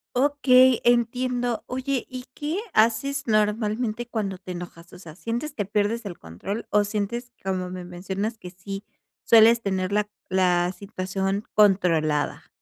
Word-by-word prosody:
Okey, 260 -2 +5
entiendo. 245 0 +1
Oye, 260 +1 -2
¿Y 255 -1 -7
qué 305 +7 -3
haces 235 +6 +2
normalmente 215 +2 0
cuando 205 -5 -3
te 185 - -8
enojas? 175 -1 -9
O - - -11
sea, 160 -4 -11
¿sientes 235 - -4
que 205 - -2
pierdes 210 +3 0
el 185 -4 -6
control 140 - -6
o 210 0 +4
sientes, 220 +4 -3
como 185 -1 -2
me 180 0 -6
mencionas, 190 +5 -4
que 180 - -8
sí 195 +2 -7 0.4
sueles 230 +1 +6
tener 190 -2 -1
la 210 0 +1 0.2
la 180 -1 +2
situación 195 0 -3
controlada? 165 -8 +2
210 Hz, 145 wpm, -25 LUFS, 185-240 Hz, 0.4 s, sueles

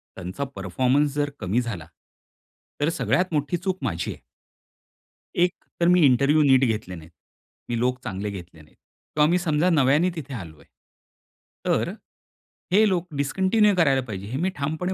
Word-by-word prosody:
त्यांचा 95 +9 -5
परफॉर्मन्स 130 +9 +1
जर 145 0 0
कमी 105 +5 0
झाला. 95 -10 -6 0.9
तर 150 - +3
सगळ्यात 180 +1 0
मोठी 150 +4 0
चूक 185 +1 -2
माझी 85 -8 -2
आहे. - - -17 1.2
एक 180 - -3 0.3
तर 170 - +3
मी 180 -1 +5
इंटरव्ह्यू 140 +4 +4
नीट 135 -1 +5
घेतले 105 -5 -2
नाहीत. 80 0 -12 0.6
मी 120 - -1
लोक 125 +1 0
चांगले 100 +2 -4
घेतले 85 -4 -10
नाहीत. 75 - -22 0.4
तर 150 - +2
आम्ही 165 +4 +4
समजा 165 +1 +1
नव्याने 150 +3 +3
तिथे 140 -3 -7
आलो 85 -9 -8
आहे. - - -20 1.0
तर - - +1 0.8
हे 215 +3 +5
लोक 180 -1 -1
डिस्कंटिन्यू 190 +8 +2
करायला 140 -6 +3
पाहिजे, 100 -1 -6
हे 130 +4 -4
मी 190 - +1
ठामपणे 160 +6 -2
140 Hz, 155 wpm, -24 LUFS, 105-170 Hz, 1.2 s, मी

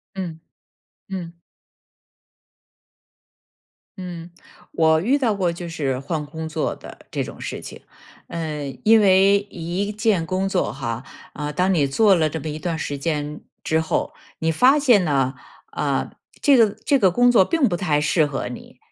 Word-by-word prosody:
嗯， 170 -4 -5 0.7
嗯。 175 -3 -7 2.6
嗯， 175 -2 -7 0.4
我 160 -1 +4
遇 255 - +2
到 240 -6 +1
过 185 -4 0
就 170 0 -7
是 140 -6 -2
换 150 +3 -3
工 160 +2 -6
作 155 - -2
的 - - -12
这 - - -2
种 - - -10
事 - - -5
情。 - - -10 0.5
呃， 155 -4 -4 0.2
因 220 +1 +6
为 195 0 +5
一 175 +4 -3
件 210 -5 +1
工 185 +3 -1
作 190 -2 0
哈， 120 -2 -4 0.3
啊， 150 0 -4
当 185 +5 +1
你 155 -5 +3
做 200 +8 +4
了 160 -3 +1
这 160 - -4
么 155 - -5
一 155 +1 -5
段 165 0 -2
时 145 - -3
间 150 0 -3 0.2
之 160 0 +1
后， 160 - -2 0.2
你 160 0 0
发 255 - +5
现 245 -10 +4
呢， 135 -4 +1 0.4
呃， - - -1 0.3
这 285 -3 +5
个 225 -4 +5
这 285 - +3
个 190 -4 +5
工 245 +6 +4
作 210 -6 +6
并 320 - +2
不 175 - -1
太 160 -6 +1
适 155 +2 +2
合 135 -4 -3
你。 125 - -11
170 Hz, 175 characters per minute, -22 LUFS, 150-195 Hz, 2.6 s, 因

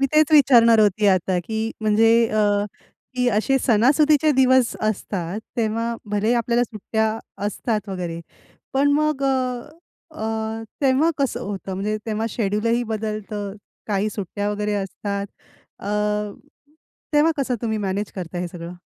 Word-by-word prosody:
मी 275 - +3
तेच 305 -1 +4
विचारणार 235 -6 +6
होती 210 0 +3
आता 185 -1 +2
की 220 +3 -3 0.2
म्हणजे 220 +1 +4 0.2
अ, 205 -1 +2 0.5
की 250 -1 +2
असे 270 +5 +2
सणासुदीचे 285 +6 +4
दिवस 260 -2 +4
असतात 195 -2 -3 0.2
तेव्हा 230 +1 -1 0.2
भलेही 210 +3 +1
आपल्याला 235 0 +1
सुट्ट्या 220 0 -2 0.3
असतात 210 0 -2
वगैरे. 175 -3 -4 0.5
पण 280 +2 +3
मग 305 -1 +1
अ, 255 -1 -1 0.5
अ, 220 0 -3 0.2
तेव्हा 275 +4 +3
कसं 265 -3 0
होतं, 195 -3 -5
म्हणजे 205 +3 -2
तेव्हा 220 +1 -1
शेड्यूल 210 0 -1
ही 235 +1 +2
बदलतं, 210 -1 -4 0.3
काही 205 0 0
सुट्ट्या 205 0 -3
वगैरे 210 0 -1
असतात 200 0 -3 0.5
अ, - - -8 1.3
तेव्हा 300 +2 +4
कसं 265 -3 0
तुम्ही 220 -1 -1
मॅनेज 200 0 -2
करता 180 -1 -5
हे 175 0 -3
सगळं? 170 0 -8
220 Hz, 135 wpm, -22 LUFS, 205-250 Hz, 1.3 s, विचारणार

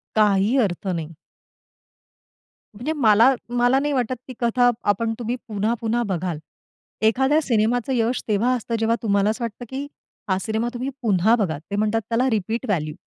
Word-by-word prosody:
काही 210 +2 +3
अर्थ 195 -2 -2
नाही. 165 -3 -3 1.6
म्हणजे 250 +10 -3
मला, 235 -2 +5
मला 245 +2 +2
नाही 290 +1 0
वाटत 255 -1 0
ती - - -6
कथा 245 +1 +3 0.2
आपण 225 +3 -2
तुम्ही 240 +1 -2
पुन्हा-पुन्हा 225 +2 -1
बघाल. 180 -4 -2 0.6
एखाद्या 265 +7 +3
सिनेमाचं 240 +1 +1
यश 240 0 0
तेव्हा 225 +5 +2
असतं 230 -1 -3
जेव्हा 225 +1 +2
तुम्हाला 200 -2 +2
असं 235 +2 -3
वाटतं, 230 +1 -6
की 270 +3 -5 0.4
हा 190 - +2
सिनेमा 220 +2 -1
तुम्ही 250 +2 -3
पुन्हा 215 0 +3
बघाल. 160 -10 -1
ते 200 - -2
म्हणतात 215 +2 +1
त्याला 240 +3 +1
रिपीट 220 +3 -2
व्हॅल्यू. 155 -7 -1
225 Hz, 155 wpm, -22 LUFS, 205-245 Hz, 1.6 s, मला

